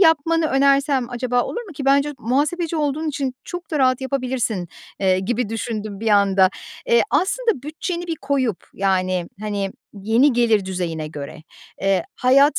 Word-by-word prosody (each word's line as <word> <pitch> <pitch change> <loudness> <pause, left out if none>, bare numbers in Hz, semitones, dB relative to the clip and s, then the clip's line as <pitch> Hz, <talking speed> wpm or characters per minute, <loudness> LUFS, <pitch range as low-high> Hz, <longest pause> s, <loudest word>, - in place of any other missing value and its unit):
yapmanı 325 -1 +4
önersem 275 -2 +2
acaba 245 0 0
olur 475 - -4
mu 395 - -11
ki, 280 -2 -6
bence 280 +2 +3
muhasebeci 300 +8 0
olduğun 305 +1 -1
için 270 -3 -2
çok 355 -1 -7
da 305 - 0
rahat 255 -1 +3
yapabilirsin, 255 - -2 0.3
eee, 185 -1 +3
gibi 235 +4 -1
düşündüm 215 -2 -4
bir 225 - 0
anda. 195 -2 +4 0.4
E, 470 - +6
aslında 445 - +1
bütçeni 340 +4 -4
bir 330 - -3
koyup, 270 - -1
yani, 185 -2 0
hani, 200 -2 -2 0.2
yeni 225 +8 +3
gelir 225 -4 +3
düzeyine 170 -4 -3
göre, 150 0 -8 0.4
eee, 195 -2 +2
hayat 275 +3 +4
255 Hz, 155 wpm, -21 LUFS, 200-290 Hz, 0.4 s, E